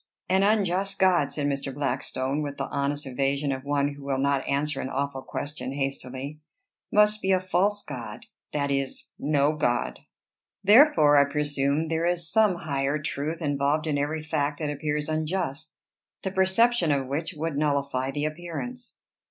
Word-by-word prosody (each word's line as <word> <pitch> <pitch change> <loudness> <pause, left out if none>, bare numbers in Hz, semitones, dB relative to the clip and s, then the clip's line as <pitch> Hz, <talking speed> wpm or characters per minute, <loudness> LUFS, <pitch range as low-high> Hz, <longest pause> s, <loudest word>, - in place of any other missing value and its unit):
"An 190 +1 +3
unjust 195 -2 +1
god," 175 -7 +3
said 145 0 -2
Mr. 140 -1 -1
Blackstone, 135 0 -2
with 145 -1 -4
the 135 - -2
honest 145 +1 -2
evasion 140 +2 0
of 130 -1 -4
one 140 0 0
who 140 - -12
will 140 -1 -1
not 140 0 +1
answer 140 0 0
an 130 - -4
awful 135 0 -2
question 145 -1 -5
hastily, 135 +1 -4 0.5
"must 210 0 +4
be 190 - +1
a 185 - +4
false 185 +3 +1
god, 120 -5 -7 0.3
that 140 -1 -1
is, 135 -1 -2
no 145 +1 +2
god. 120 -5 0 0.6
Therefore 200 - +7
I 140 - +6
presume 145 +1 0
there 165 +1 0
is 175 -1 0
some 215 -1 +3
higher 140 0 0
truth 155 +3 -3
involved 145 +2 +1
in 145 -2 0
every 155 +2 -2
fact 150 -2 -1
that 150 -2 -2
appears 150 0 -2
unjust, 155 -1 -2 0.5
the 190 - -2
perception 190 0 +3
of 140 -2 +1
which 150 +5 -3
would 160 0 -3
nullify 140 -3 0
the 145 +2 -2
appearance." 175 +11 -6
145 Hz, 160 wpm, -26 LUFS, 140-170 Hz, 0.6 s, Therefore